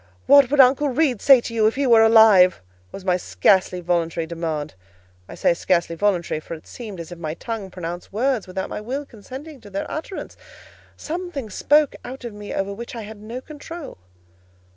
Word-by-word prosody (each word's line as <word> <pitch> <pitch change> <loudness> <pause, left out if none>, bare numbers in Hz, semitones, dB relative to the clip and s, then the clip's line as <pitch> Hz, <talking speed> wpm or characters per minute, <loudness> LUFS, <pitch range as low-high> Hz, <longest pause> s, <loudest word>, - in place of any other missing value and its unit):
"What 280 -3 +7
would 290 +1 0
Uncle 270 +3 +5
Reed 255 -4 +1
say 270 -3 +7
to 230 - -7
you, 220 -2 +3
if 220 - 0
he 280 +1 0
were 230 -3 +6
alive?" 220 -5 +6 0.3
was 190 - -9
my 180 -1 +2
scarcely 185 0 +2
voluntary 170 -1 -1
demand. 160 -3 -4 0.6
I - - -8
say - - +2
scarcely 170 -1 0
voluntary, 175 -4 0
for 165 - -8
it 155 - -14
seemed 215 -7 -9
as 170 +1 -8
if 175 - -9
my 155 -1 -4
tongue 220 -3 -5
pronounced 175 -1 -7
words 235 0 0
without 190 +1 -4
my - - -6
will 265 +6 -4
consenting 265 +5 -11
to 205 - -13
their 195 0 -4
utterance: 320 +5 -6 0.6
something 320 - -5
spoke 295 +7 +3
out 260 +1 -8
of 235 - -6
me 205 0 -9
over 195 +1 -2
which 235 +4 -8
I 230 - -6
had 210 0 -10
no 230 +4 -7
control. 305 - -9
215 Hz, 190 wpm, -22 LUFS, 180-265 Hz, 0.6 s, What